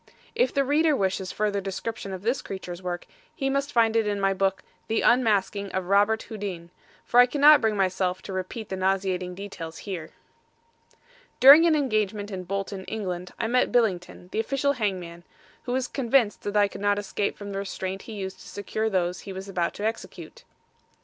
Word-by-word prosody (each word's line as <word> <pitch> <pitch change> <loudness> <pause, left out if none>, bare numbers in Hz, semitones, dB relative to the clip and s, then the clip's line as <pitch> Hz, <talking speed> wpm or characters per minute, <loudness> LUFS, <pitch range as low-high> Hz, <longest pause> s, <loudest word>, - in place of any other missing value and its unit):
If 480 +2 +2
the 275 - +2
reader 300 +2 +3
wishes 190 -3 -1
further 205 -1 -1
description 195 +1 -5
of 190 0 -6
this 240 +5 0
creature's 185 -2 -7
work, 175 -1 -4 0.3
he 270 -1 -1
must 275 +1 -1
find 230 -3 +3
it 225 -2 +2
in 205 -1 -1
my 195 0 +2
book, 195 0 0 0.2
The 225 - 0
Unmasking 205 -4 +2
of 190 -1 -1
Robert 205 +3 +3
Houdin, 190 -6 -6 0.3
for 245 - +4
I 245 - +8
cannot 295 +3 +6
bring 220 -2 +1
myself 185 -1 0
to 195 - -7
repeat 190 +4 -5
the 190 - -3
nauseating 185 -1 -1
details 180 -4 -7
here. 175 -6 -5 1.3
During 290 +6 +9
an 320 - +4
engagement 215 -7 -1
in 185 -2 -5
Bolton, 195 0 -4
Eng., 180 -5 -4
I - - -2
met 250 +2 +2
Billington, 185 -6 0
the - - -2
official 275 +5 +1
hangman, 185 -8 -3 0.4
who 245 - -3
was 255 0 0
convinced 245 -4 +1
that 205 0 -2
I 205 -1 +5
could 200 - -10
not 205 0 +2
escape 205 0 -2
from 205 -1 -7
the 195 - -3
restraint 190 -1 -4
he 225 - -9
used 190 -2 -6
to - - -13
secure 215 +2 -3
those 180 -2 0
he 195 - -8
was 190 +1 -7
about 180 -3 -2
to 205 - -4
execute. 230 - -5
200 Hz, 190 wpm, -26 LUFS, 190-230 Hz, 1.3 s, During